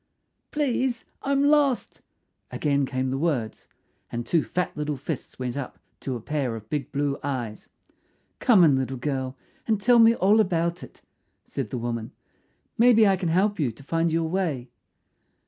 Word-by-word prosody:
"Please, 260 Hz, -4 st, -1 dB, 0.2 s
I'm 275 Hz, 0 st, +1 dB
lost," 285 Hz, -3 st, +2 dB, 0.5 s
again 140 Hz, -2 st, 0 dB
came 130 Hz, 0 st, -2 dB
the 135 Hz, -, -2 dB
words, 135 Hz, -9 st, -2 dB, 0.4 s
and 120 Hz, 0 st, -3 dB
two 165 Hz, -3 st, +2 dB
fat 180 Hz, 0 st, -2 dB
little 150 Hz, -1 st, -2 dB
fists 145 Hz, +1 st, -6 dB
went 125 Hz, -1 st, -3 dB
up 140 Hz, -2 st, -5 dB, 0.2 s
to 130 Hz, -, -4 dB
a -, -, -4 dB
pair 135 Hz, -1 st, -2 dB
of 110 Hz, -1 st, -11 dB
big 150 Hz, -2 st, -2 dB
blue 140 Hz, 0 st, -1 dB
eyes. 125 Hz, -6 st, -4 dB, 0.7 s
"Come 215 Hz, -8 st, +5 dB
in, 145 Hz, -5 st, +5 dB
little 130 Hz, 0 st, -2 dB
girl, 130 Hz, 0 st, -3 dB, 0.3 s
and 220 Hz, -3 st, +2 dB
tell 240 Hz, +3 st, +5 dB
me 230 Hz, 0 st, +7 dB
all 205 Hz, +3 st, +4 dB
about 170 Hz, -3 st, +1 dB
it," -, -, -13 dB, 0.4 s
said 130 Hz, -6 st, -4 dB
the 125 Hz, -, -4 dB
woman. 115 Hz, -1 st, -4 dB, 0.7 s
"Maybe 230 Hz, -2 st, +6 dB
I 195 Hz, -, +4 dB
can 180 Hz, -2 st, -2 dB
help 195 Hz, +4 st, +2 dB
you 135 Hz, -6 st, +1 dB
to 115 Hz, -, -16 dB
find 165 Hz, +3 st, 0 dB
your 165 Hz, 0 st, +1 dB
way." 160 Hz, -9 st, -2 dB
150 Hz, 165 wpm, -25 LUFS, 130-200 Hz, 0.7 s, me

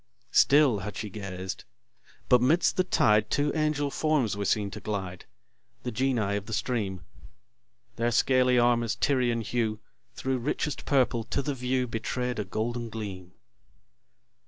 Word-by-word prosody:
Still 140 Hz, -7 st, +5 dB
had 100 Hz, 0 st, -6 dB
she 105 Hz, -2 st, -5 dB
gazed; 95 Hz, -2 st, -6 dB, 0.6 s
but 125 Hz, -1 st, +5 dB
'midst 155 Hz, +8 st, +3 dB
the 185 Hz, -, +3 dB
tide 105 Hz, -, +3 dB
Two 145 Hz, 0 st, +1 dB
angel 150 Hz, -2 st, 0 dB
forms 150 Hz, -10 st, +1 dB
were 100 Hz, 0 st, -3 dB
seen 100 Hz, 0 st, 0 dB
to 105 Hz, -, -7 dB
glide, 95 Hz, -4 st, -5 dB, 0.6 s
The 125 Hz, -, -3 dB
Genii 120 Hz, -5 st, 0 dB
of 100 Hz, 0 st, -7 dB
the 110 Hz, -, -5 dB
stream: 100 Hz, -8 st, -2 dB, 1.0 s
Their 120 Hz, +1 st, +1 dB
scaly 125 Hz, +1 st, +3 dB
armour's 120 Hz, -1 st, +2 dB
Tyrian 125 Hz, -4 st, +1 dB
hue 110 Hz, -1 st, -1 dB, 0.4 s
Thro' 130 Hz, 0 st, -1 dB
richest 140 Hz, +3 st, -2 dB
purple 125 Hz, -4 st, +2 dB
to 140 Hz, -, -2 dB
the 145 Hz, -, -1 dB
view 125 Hz, 0 st, -1 dB
Betray'd 125 Hz, +1 st, -3 dB
a -, -, 0 dB
golden 120 Hz, +1 st, -3 dB
gleam. 95 Hz, -5 st, -7 dB
120 Hz, 145 wpm, -28 LUFS, 105-130 Hz, 1.0 s, Still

